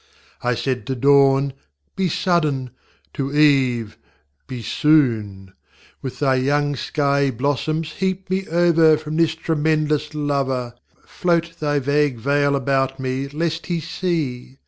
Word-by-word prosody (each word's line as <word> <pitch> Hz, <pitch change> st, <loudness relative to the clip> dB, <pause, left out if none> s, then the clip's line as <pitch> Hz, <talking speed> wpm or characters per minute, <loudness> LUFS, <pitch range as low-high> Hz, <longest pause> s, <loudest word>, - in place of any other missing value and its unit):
I 125 Hz, 0 st, 0 dB
said 125 Hz, +2 st, -3 dB
to 135 Hz, -, -2 dB
Dawn: 140 Hz, +1 st, +4 dB, 0.4 s
Be 190 Hz, -2 st, 0 dB
suddenŌĆöto 140 Hz, -4 st, -2 dB
Eve: 130 Hz, -7 st, +2 dB, 0.5 s
Be 125 Hz, -3 st, -6 dB
soon; 110 Hz, -10 st, +1 dB, 0.5 s
With 130 Hz, -, -6 dB
thy 135 Hz, -2 st, +2 dB
young 145 Hz, +2 st, +1 dB
skiey 140 Hz, -1 st, 0 dB
blossoms 145 Hz, +5 st, -2 dB
heap 190 Hz, +1 st, -3 dB
me 190 Hz, +1 st, -2 dB
over 165 Hz, -2 st, +4 dB
From 155 Hz, 0 st, -6 dB
this 165 Hz, -1 st, +2 dB
tremendous 155 Hz, -2 st, 0 dB
LoverŌĆö 140 Hz, -5 st, -2 dB, 0.3 s
Float 170 Hz, -1 st, -1 dB
thy 145 Hz, -1 st, 0 dB
vague 145 Hz, -1 st, +1 dB
veil 140 Hz, +4 st, +1 dB
about 135 Hz, 0 st, 0 dB
me, 130 Hz, +1 st, -2 dB
lest 160 Hz, +3 st, -3 dB
He 175 Hz, -2 st, -1 dB
see! 150 Hz, -7 st, -3 dB
145 Hz, 125 wpm, -21 LUFS, 130-155 Hz, 0.5 s, Dawn